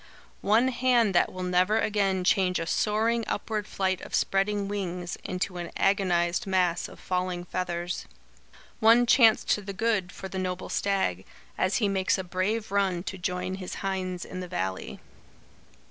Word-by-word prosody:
One 225 +6 +3
hand 245 -4 +2
that 175 - +3
will 185 0 -6
never 180 +4 +2
again 195 -3 +1
change 180 0 +2
a 165 - -2
soaring 225 +5 +1
upward 210 0 -2
flight 190 -1 -1
of - - -4
spreading 200 +1 +1
wings, 180 -3 -3
into 180 0 -3
an 175 -1 -5
agonised 185 0 +1
mass 180 -2 +1
of - - -14
falling 180 -1 -2
feathers. 175 -1 -3 0.7
One 230 +2 +6
chance 230 -2 +5
to 210 - +1
the 200 0 -6
good, 200 -3 0
for 190 - -7
the 190 0 -5
noble 185 0 -3
stag, 190 - 0 0.3
as 185 +1 +1
he 210 - +2
makes 190 -1 +1
a 190 - -3
brave 190 +5 -2
run 190 -3 +1
to 190 - -5
join 180 +1 -2
his 185 - -5
hinds 185 -2 -2
in 185 - -7
the 180 - -5
valley." 95 - -4
190 Hz, 160 wpm, -27 LUFS, 180-205 Hz, 0.7 s, One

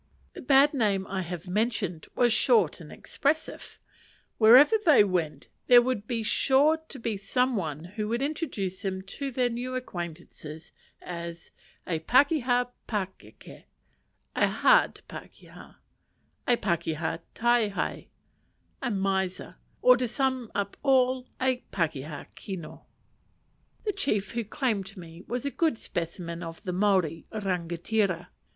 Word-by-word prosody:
The - - -9
bad 275 +3 +5
name 205 -7 +1
I 195 -1 -3
have 175 0 -6
mentioned 205 -4 -1
was 240 -2 +3
short 220 - +3
and 155 - -11
expressive: 305 +3 -3 0.6
wherever 250 - +8
they 300 - +7
went, 165 -7 -2 0.2
there 245 -1 +8
would 240 -5 -2
be 230 -2 -2
sure 275 +8 +3
to 315 -3 -11
be 230 -4 -3
some 250 +6 0
one 155 -6 -3
who 210 +4 -5
would 235 +4 -1
introduce 265 - -3
them 190 -1 -3
to 275 +8 -5
their 250 -1 0
new 250 +2 -4
acquaintances 170 -7 -7 0.3
as 170 -1 -7 0.3
"a 165 -3 -1
pakeha 250 - +3 0.2
pakeke," 195 -4 -6 0.7
a - - +3
hard - - +3
pakeha; - - -12 0.7
"a 245 - +4
pakeha 165 -2 -1 0.2
taehae" 235 -3 0 0.7
a 265 - -1
miser; 190 -3 -2 0.3
or, 250 0 +7
to 250 0 -1
sum 260 -1 -1
up 200 0 -2
all, 255 -2 +2
"a 260 -1 +2
pakeha 150 -4 -3
kino." 185 -5 -8 1.0
The 415 - 0
chief 215 - -1
who 235 0 -2
claimed 210 -4 -2
me 165 -1 -10
was 245 +3 -3
a 280 - -1
good 315 -6 +1
specimen 170 -2 -4
of 165 -1 -7
the 180 -3 -3
Maori 185 -5 +1
rangatira. 185 -1 -1
210 Hz, 130 wpm, -27 LUFS, 175-250 Hz, 1.0 s, wherever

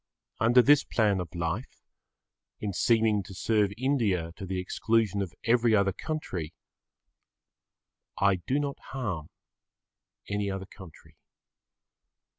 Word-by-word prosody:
Under 120 +2 +5
this 145 +1 +6
plan 105 -4 +1
of 90 0 -6
life, 85 +8 -4 0.8
in 105 -2 -3
seeming 110 0 +3
to 95 0 -11
serve 105 0 +1
India 110 -11 0
to 95 - -7
the 95 0 -2
exclusion 105 +2 0
of 95 -4 -5
every 115 -1 +3
other 100 -2 +2
country 95 - -5 1.6
I 100 -1 +3
do 130 +10 -1
not 140 -1 -3
harm 100 - -4 1.0
any 100 0 -1
other 95 0 -4
country. 95 -5 -15
100 Hz, 115 wpm, -28 LUFS, 95-115 Hz, 1.6 s, this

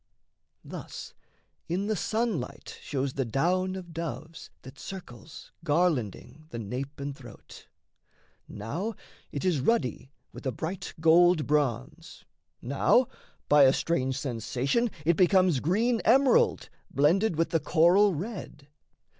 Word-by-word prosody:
Thus - - -8 0.6
in 185 +4 -1
the 215 +1 0
sunlight 215 - -3
shows 135 -1 -2
the 135 - -1
down 180 - 0
of 175 -3 -8
doves 165 0 -6
That 130 +2 -12
circles, 160 - -10
garlanding, 155 - -1
the 120 - -7
nape 125 +7 -5
and 140 0 -4
throat: 120 -5 -14 0.8
Now 170 - -4 0.4
it 145 - -4
is 175 -6 +2
ruddy 135 - 0 0.2
with - - -7
a - - +1
bright 165 +9 -5
gold 165 0 +5
bronze, 150 +3 -2 0.4
Now, 250 0 +3 0.4
by 145 0 +6
a 130 - +5
strange 130 -6 -1
sensation 130 - -1 0.2
it 170 0 +3
becomes 185 -5 +4
Green 225 - +1
emerald 275 - +3 0.2
blended 170 +8 +2
with 165 +1 0
the 165 - +2
coral 175 +6 +4
red. 180 -5 -7
160 Hz, 120 wpm, -28 LUFS, 135-185 Hz, 0.8 s, by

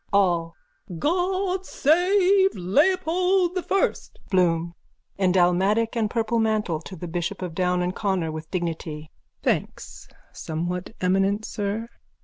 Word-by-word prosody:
ALL: 175 -4 +2 0.4
God 370 - 0
save 380 +5 +3
Leopold 360 - +2
the 365 - -1
First! 390 +2 -1
BLOOM: 170 -2 +2 0.5
(In 185 -2 +3
dalmatic 190 +6 +2
and 220 -2 0
purple 230 0 0
mantle, 215 -8 0
to 185 - -9
the 175 +1 -7
bishop 175 +3 -3
of 175 -3 -5
Down 180 0 +1
and 180 +1 -2
Connor, 190 -6 -1
with 155 0 -7
dignity.) 160 -3 -4 0.3
Thanks, - - -3 0.3
somewhat 175 +5 -4
eminent 195 +3 +1
sir. 210 +2 -3
195 Hz, 125 wpm, -24 LUFS, -, 0.5 s, save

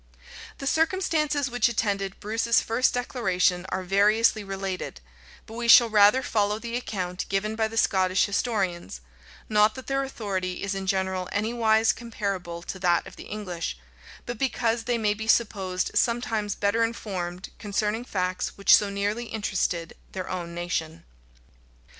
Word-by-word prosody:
The 275 - -7
circumstances 310 -3 +1
which 245 -1 +2
attended 200 -4 -1
Bruce's 225 +2 +2
first 240 +3 +1
declaration 190 -7 0
are 190 - -2
variously 210 +3 +3
related; 195 - -5 0.5
but 220 - -12
we 235 +1 -3
shall 235 -1 +8
rather 210 +5 +5
follow 210 -2 +1
the 235 +1 -5
account 185 -7 -4
given 210 +3 -1
by 220 0 +1
the 225 +1 -8
Scottish 185 -3 +3
historians; 195 - -2 0.5
not 215 0 +3
that 260 - -8
their 275 0 0
authority 195 -9 -3
is 200 0 -1
in 195 -1 -4
general 190 -1 -1
anywise 220 +1 +2
comparable 195 -7 -4
to 190 - -6
that 175 -2 +2
of 195 - -11
the - - -10
English, 180 - -5 0.5
but 240 -2 -5
because 235 -3 0
they 240 0 +1
may 210 -2 +1
be 220 +1 -6
supposed 195 -5 +1
sometimes 225 -3 0
better 205 +3 +1
informed 185 -6 -4
concerning 210 +2 -1
facts 185 -5 -2
which 200 - +7
so 205 - +1
nearly 205 +4 -2
interested 190 -6 -2 0.2
their 185 -1 -4
own 170 -2 -5
nation. 170 -2 -3
210 Hz, 145 wpm, -26 LUFS, 185-230 Hz, 0.5 s, shall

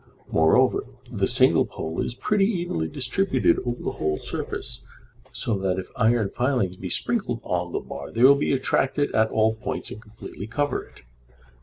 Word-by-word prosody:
Moreover, 80 -1 +3 0.2
the - - 0
single - - +4
pole 80 +1 -4
is 120 - -3
pretty 200 +7 +2
evenly 175 - -1
distributed 80 - +1
over 120 0 -4
the - - -1
whole 75 -1 -1
surface, - - -5 0.5
so 105 -4 -1
that 95 -1 0
if 95 - -5
iron 115 -3 +2
filings 120 -8 0
be 90 0 -6
sprinkled 125 - -1
on 90 -1 -2
the - - -1
bar 70 0 -8
they 115 - 0
will 135 +2 +9
be 140 - 0
attracted 135 +1 +1
at 110 0 +3
all 110 0 +2
points 110 - -5
and 110 - -8
completely 110 -1 -9
cover 145 +5 -1
it. - - -19
110 Hz, 170 wpm, -25 LUFS, 90-135 Hz, 0.5 s, will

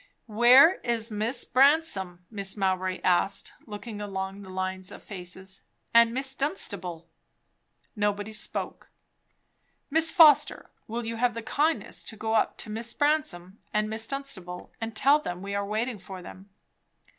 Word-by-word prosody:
"Where 245 - +6
is 230 -1 -1
Miss 225 +4 -1
Bransome?" 255 - +2
Mrs. 200 -1 -4
Mowbray 185 -1 -1
asked, 185 +2 +1
looking 210 0 -7
along 195 -1 -5
the 190 - -11
lines 185 0 -4
of - - -11
faces. 190 0 -8 0.3
"And 235 0 +6
Miss 265 +2 -1
Dunstable?" 195 - -3 0.9
Nobody 205 0 -1
spoke. 210 - -2 1.0
"Miss 320 +2 +4
Foster, 315 -6 +5 0.2
will 230 +1 -4
you 230 0 -4
have 240 0 +1
the 230 - -5
kindness 305 +8 0
to 220 - -6
go 220 +1 -2
up 220 - +1
to 215 - -5
Miss 225 +2 -4
Bransome 290 - 0
and 215 0 0
Miss 220 +1 -3
Dunstable, 205 -11 -6
and 225 0 -4
tell 280 +6 +5
them 180 -9 -6
we 200 0 -5
are 200 0 -1
waiting 220 +2 -2
for 185 -1 -9
them?" 190 +3 -12
215 Hz, 145 wpm, -27 LUFS, 190-245 Hz, 1.0 s, Where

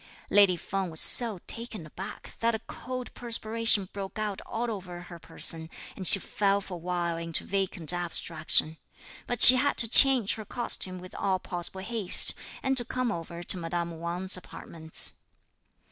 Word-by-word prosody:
Lady 200 -3 +4
Feng 190 +2 -5
was 160 -1 -4
so 230 -5 +7
taken 230 -7 -5
aback 185 +5 -11
that 230 0 0
a - - -6
cold 255 -1 -8
perspiration 230 -3 0
broke 195 0 -8
out 210 -2 -4
all 235 +1 -4
over 180 -4 -8
her 175 -1 -13
person, 160 0 -2 0.3
and 185 - -4
she - - +10
fell 200 +1 -1
for 195 -1 -10
a - - -6
while 175 -1 -4
into 165 -1 -4
vacant 185 -5 -3
abstraction. 165 -2 -1 0.5
But 245 -1 0
she 255 - +11
had 285 +2 -1
to 230 - +2
change 250 -2 +6
her 220 - -8
costume, 190 -6 +1
with 180 0 -13
all 190 -1 -2
possible 180 +1 -6
haste, 210 -2 +2 0.3
and 265 0 -1
to 240 - +5
come 250 0 -4
over 170 -1 -8
to 185 - 0
madame 170 0 -5
Wang's 175 +3 -2
apartments. 160 -3 -6
190 Hz, 165 wpm, -26 LUFS, 170-225 Hz, 0.5 s, she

